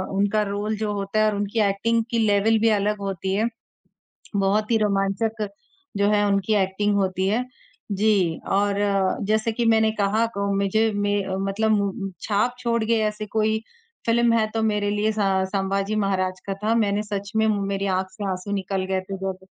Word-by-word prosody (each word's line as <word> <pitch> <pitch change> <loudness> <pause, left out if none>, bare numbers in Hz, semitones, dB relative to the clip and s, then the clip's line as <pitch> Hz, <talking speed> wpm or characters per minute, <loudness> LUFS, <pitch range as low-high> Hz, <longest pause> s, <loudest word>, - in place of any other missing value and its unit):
उनका 205 +2 +2
रोल 205 +2 -2
जो 215 0 -2
होता 200 +1 -2
है 215 - +4
और 210 - -2
उनकी 205 +2 -2
एक्टिंग 230 +4 +1
की 235 - +1
लेवल 205 +2 +3
भी 225 - +4
अलग 210 0 +1
होती 190 -1 -2
है। 220 +3 +2 0.9
बहुत 200 +3 +1
ही 225 - +4
रोमांचक 210 +1 0 0.5
जो 200 0 +3
है 205 -1 +3
उनकी 200 +1 +1
एक्टिंग 200 +2 0
होती 190 -1 0
है 225 +5 +1 0.5
जी, 195 -5 +2
और 200 0 +1 0.5
जैसे 220 +2 +1
कि 235 +1 -1
मैंने 220 -1 +4
कहा 210 +3 +2
को 200 0 -2
मुझे 215 +3 +2
में 205 -1 0 0.2
मतलब 215 +3 0
मु 200 -2 +2 0.3
छाप 220 +4 0
छोड़ 235 -2 0
गए 230 +1 +2
ऐसे 210 0 -4
कोई 220 +1 0 0.5
फ़िल्म 235 0 +3
है 220 -1 +2
तो 225 - 0
मेरे 210 -2 +1
लिए 210 +1 +1
स 215 - -8 0.3
संभाजी 195 +1 -1
महाराज 185 -3 0
का 195 - -2
था। 220 +2 +2
मैंने 210 -2 +1
सच 200 -1 -5
में 220 0 +3
मु 210 -2 +1
मेरी 195 0 -2
आँख 190 0 -2
से 205 +1 -6
आँसू 185 +2 -5
निकल 195 -1 -2
गए 190 0 -1
थे 195 - -3
जब 190 0 -5
205 Hz, 185 wpm, -23 LUFS, 195-220 Hz, 0.9 s, है